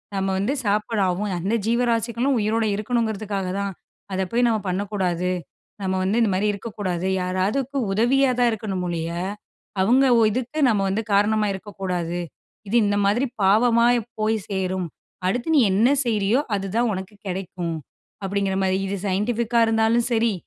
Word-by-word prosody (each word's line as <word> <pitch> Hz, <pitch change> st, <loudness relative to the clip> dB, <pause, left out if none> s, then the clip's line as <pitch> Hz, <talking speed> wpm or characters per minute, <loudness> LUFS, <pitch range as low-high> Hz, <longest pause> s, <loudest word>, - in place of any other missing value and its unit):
நம்ம 195 Hz, 0 st, 0 dB
வந்து 210 Hz, +9 st, 0 dB
சாப்பாடு 210 Hz, +1 st, 0 dB
ஆகும் 195 Hz, +2 st, -2 dB
அந்த 200 Hz, +6 st, 0 dB
ஜீவராசிகளும் 235 Hz, +2 st, +1 dB
உயிரோடு 220 Hz, +1 st, +1 dB
இருக்கணுங்கிறதுக்காக 215 Hz, -3 st, -1 dB
தான். 200 Hz, -1 st, -2 dB, 0.4 s
அத 190 Hz, -, 0 dB
போய் 240 Hz, +1 st, +3 dB
நம்ம 225 Hz, -2 st, +1 dB
பண்ணக்கூடாது. 185 Hz, -2 st, -1 dB, 0.5 s
நம்ம 190 Hz, -1 st, -1 dB
வந்து 200 Hz, +5 st, +1 dB
இந்த 220 Hz, -, +3 dB
மாரி 195 Hz, +3 st, +1 dB
இருக்கக்கூடாது. 195 Hz, -4 st, -4 dB, 0.2 s
யாராவது 185 Hz, +7 st, 0 dB, 0.3 s
உதவியா 255 Hz, +6 st, +3 dB
தான் 245 Hz, -1 st, +4 dB
இருக்கணும் 200 Hz, -4 st, -3 dB
ஒழிய, 165 Hz, -1 st, -2 dB, 0.7 s
அவங்க 250 Hz, +7 st, +4 dB, 0.3 s
இதுக்கு 255 Hz, +6 st, -3 dB
நம்ம 210 Hz, -4 st, +2 dB
வந்து 205 Hz, +4 st, 0 dB
காரணமா 210 Hz, +1 st, +3 dB
இருக்கக்கூடாது. 180 Hz, -3 st, -4 dB, 0.5 s
இது 220 Hz, -, -1 dB
இந்த 205 Hz, 0 st, +1 dB
மாரி 235 Hz, +7 st, +2 dB, 0.2 s
பாவமா 230 Hz, +4 st, +4 dB, 0.4 s
போய் 220 Hz, +1 st, +2 dB
சேரும். 185 Hz, -2 st, -1 dB, 0.4 s
அடுத்து 245 Hz, -, -1 dB
நீ 290 Hz, -, +6 dB
என்ன 225 Hz, +6 st, +4 dB, 0.2 s
செய்றீயோ, 215 Hz, +1 st, +2 dB, 0.2 s
அதுதான் 205 Hz, +5 st, 0 dB
உனக்கு 190 Hz, +2 st, -6 dB
கெடைக்கும். 180 Hz, -2 st, -4 dB, 0.5 s
அப்டிங்கிற 195 Hz, 0 st, -1 dB
மாரி 190 Hz, 0 st, +2 dB
இது 200 Hz, -, -2 dB
சைன்டிஃபிக்கா 230 Hz, +4 st, 0 dB
இருந்தாலும் 225 Hz, +1 st, +2 dB
சரி. 230 Hz, -1 st, +2 dB
205 Hz, 140 wpm, -23 LUFS, 190-230 Hz, 0.7 s, நீ